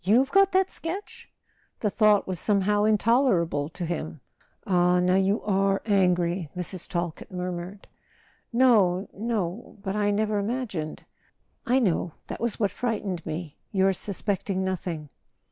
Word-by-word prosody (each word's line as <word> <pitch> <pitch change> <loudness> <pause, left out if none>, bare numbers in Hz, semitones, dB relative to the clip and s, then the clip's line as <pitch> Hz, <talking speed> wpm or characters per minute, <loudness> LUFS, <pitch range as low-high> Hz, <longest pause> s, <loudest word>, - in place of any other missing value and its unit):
You've 245 +9 +3
got 390 0 +5
that 380 0 +3
sketch?" 365 +5 -6 0.5
The 210 - +1
thought 210 -2 +4
was 185 -3 -3
somehow 205 +1 +2
intoler¬ 220 -2 +3
able 145 -3 -3
to 175 +1 -5
him. 160 -2 -4 0.5
"Ah, 180 -1 +3
now 180 +1 +3
you 195 +3 +2
are 195 -1 +2
angry," 180 -4 +2
Mrs. 180 0 -4
Talkett 170 -2 -3
murmured. 180 +1 -5 0.6
"No, 215 -7 +4
no; 215 -2 -3
but 195 -1 -2
I 205 -1 +1
never 210 0 +1
imagined 200 -8 -3 0.3
" - - -45
"I 250 - +4
know. 180 - +1
That - - -7
was 235 -2 -1
what 205 -4 +1
frightened 205 -8 -3
me—your 180 +4 -1
sus¬ 195 +1 -5
pecting 195 -2 -1
nothing." 175 -5 -3
195 Hz, 145 wpm, -26 LUFS, 180-215 Hz, 0.6 s, got